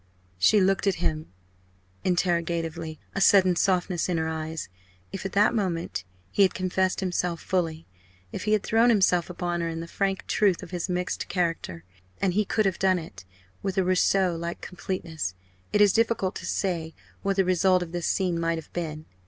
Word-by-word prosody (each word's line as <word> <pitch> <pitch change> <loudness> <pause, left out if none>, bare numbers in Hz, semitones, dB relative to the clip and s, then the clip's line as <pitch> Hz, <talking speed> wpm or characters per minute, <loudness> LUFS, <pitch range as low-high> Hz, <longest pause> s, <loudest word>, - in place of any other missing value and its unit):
She 210 - +5
looked 195 +1 +2
at 195 - +3
him 155 0 -2 0.7
interrogatively 170 -2 -1
a 195 - -2
sudden 185 -2 +6
softness 180 -1 +1
in 175 - +1
her 160 0 0
eyes. 160 0 -4 0.4
If 195 0 -4
at - - -12
that 210 +4 +4
moment 175 - -2 0.3
he - - +1
had 190 - +4
confessed 185 +1 0
himself 180 -2 -1
fully, 165 -3 -2 0.5
if - - -5
he 215 - +2
had 215 -1 +2
thrown 225 +2 +4
himself 185 -6 +3
upon 175 -1 -2
her 165 - -1
in 165 0 -4
the 165 - -6
frank 195 +2 -1
truth 195 -5 +2
of - - -10
his 180 0 -3
mixed 180 0 -2
character 165 - -2 0.4
and 190 -2 +1
he 210 +2 +2
could 215 +2 +1
have 190 -2 0
done 190 -1 +3
it, 160 - -9 0.4
with 195 0 -3
a 190 - +4
Rousseau 185 0 +2
like 170 +1 -4
completeness 165 - -4 0.4
it 210 - +3
is 205 -2 +6
difficult 225 -4 +1
to - - -7
say 165 -4 -2 0.3
what 195 0 0
the 195 -1 +3
result 185 0 +3
of 165 - -9
this 175 -1 -2
scene 180 -3 0
might 165 0 0
have 160 - -10
been. 155 -3 -4
180 Hz, 185 wpm, -26 LUFS, 165-195 Hz, 0.7 s, sudden